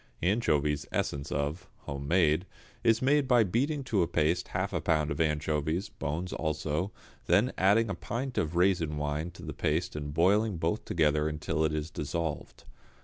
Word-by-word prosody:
=Anchovies, 75 -8 +1
Essence 70 0 -2
of= 75 +6 -2
(home 70 0 -6
made), 85 +1 +3 0.4
is 115 0 +3
made 140 +1 +3
by 120 -3 +5
beating 135 - 0
to 110 -7 +1
a 85 - +2
paste 85 +1 +1
half 95 +2 -2
a 85 - -1
pound 80 -1 +1
of 70 - -1
anchovies, 80 +2 0
bones 85 +6 -4
also, 80 +3 -2 0.4
then 120 +5 +3
adding 105 +5 +4
a 100 - -2
pint 125 +6 -4
of 80 +2 -2
raisin 85 -4 +2
wine 75 +3 -2
to 85 - -13
the - - -5
paste 80 +3 -1
and 75 -1 -4
boiling 100 +5 +3
both 85 +6 -1
together 75 -2 +2
until 80 +1 -1
it 80 - +2
is 75 +1 -3
dissolved. 80 +1 -4
85 Hz, 170 wpm, -30 LUFS, 75-100 Hz, 0.4 s, by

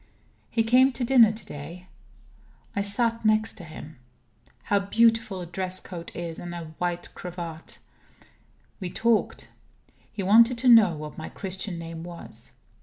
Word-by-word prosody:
He 225 - +1
came 255 +4 +5
to 245 - -3
dinner 240 -3 +6
to 215 +1 -9
day. 165 +5 -9 0.9
I 200 - +1
sat 230 +3 0
next 215 0 +3
to - - -9
him. 155 -2 -10 0.7
How 205 - +2
beautiful 220 -1 +2
a - - -5
dress 185 +2 -3
coat 170 -2 -8
is, 170 -1 -5
and 175 0 -7
a 165 -2 -8
white 175 0 -3
cravat! 170 -2 -8 1.0
We 185 -3 -4
talked. 225 +3 0 0.6
He 205 - -4
wanted 230 +5 +6
to 255 +2 +1
know 220 -8 +7
what 150 0 -8
my 160 - -6
Christian 190 -1 -4
name 165 0 -7
was. 175 -1 -8
190 Hz, 150 wpm, -26 LUFS, 170-225 Hz, 1.0 s, know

